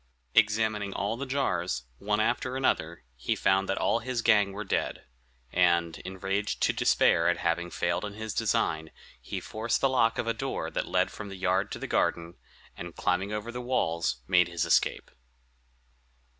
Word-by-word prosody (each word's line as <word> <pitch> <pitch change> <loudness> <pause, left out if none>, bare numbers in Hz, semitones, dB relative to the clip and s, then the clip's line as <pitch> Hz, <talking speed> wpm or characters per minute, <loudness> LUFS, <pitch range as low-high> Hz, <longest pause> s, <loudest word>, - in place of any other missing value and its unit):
Examining 110 -2 +2
all 105 +3 -1
the 135 +3 -5
jars, 90 - -1 0.2
one 105 +1 0
after 120 +3 0
another, 85 - 0
he 60 - -1
found 95 0 +2
that 95 - 0
all 115 - +2
his 120 0 -3
gang 105 -2 +4
were 105 +2 -5
dead; 100 - -2 0.5
and, 85 -2 +2
enraged 95 +2 -3
to - - +3
despair 85 +1 +3
at 90 - +1
having 85 +1 -1
failed 85 +2 -1
in 105 -1 -5
his 110 -1 -5
design, 80 0 0 0.3
he - - -5
forced 110 +2 -2
the - - +3
lock 125 -4 +2
of - - -1
a 115 - 0
door - - -3
that - - -2
led - - +1
from 105 -2 -8
the 95 - -7
yard 95 +2 0
to - - -4
the - - -5
garden, 85 0 0 0.4
and, 85 -1 -8
climbing 95 +3 0
over 105 +2 -4
the 125 +1 -5
walls, 85 - -1
made 90 -1 +4
his 85 -2 -1
escape. - - +1
100 Hz, 175 wpm, -28 LUFS, 85-110 Hz, 0.5 s, gang